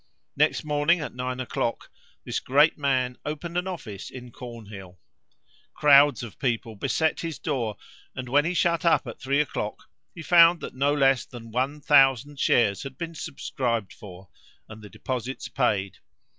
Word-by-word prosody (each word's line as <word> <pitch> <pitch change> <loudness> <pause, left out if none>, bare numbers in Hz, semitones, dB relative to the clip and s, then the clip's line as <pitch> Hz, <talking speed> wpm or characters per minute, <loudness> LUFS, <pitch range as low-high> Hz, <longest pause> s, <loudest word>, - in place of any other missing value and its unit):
Next - - +2
morning, 150 +3 +2
at 150 - -5
nine 125 +1 -4
o'clock, 120 -2 -3 0.3
this - - -2
great 145 +5 +3
man 130 -3 -1
opened 155 +3 -5
an 180 +1 -1
office 125 - -7
in 125 -1 -10
Cornhill. 105 -7 -10 0.8
Crowds 145 -2 +5
of 115 - -10
people 115 -3 -2
beset 160 +10 0
his 165 -5 -4
door, 120 -9 -3 0.4
and 130 -1 -5
when 145 +4 +3
he 175 +3 -2
shut 170 0 +1
up 170 -4 +3
at 120 - -8
three 140 +2 +1
o'clock, 130 -7 -3 0.3
he 170 - -8
found 170 0 +6
that - - -7
no 140 +2 +1
less 135 -3 +3
than 115 -2 -11
one 135 +5 -2
thousand 135 -1 +4
shares 105 -8 +2
had 135 -1 -8
been 165 0 -5
subscribed 125 -8 -3
for, 95 -3 -13 0.4
and 110 0 -11
the 105 - -11
deposits 130 +3 -5
paid. 100 -8 -1
130 Hz, 160 wpm, -25 LUFS, 115-150 Hz, 0.8 s, found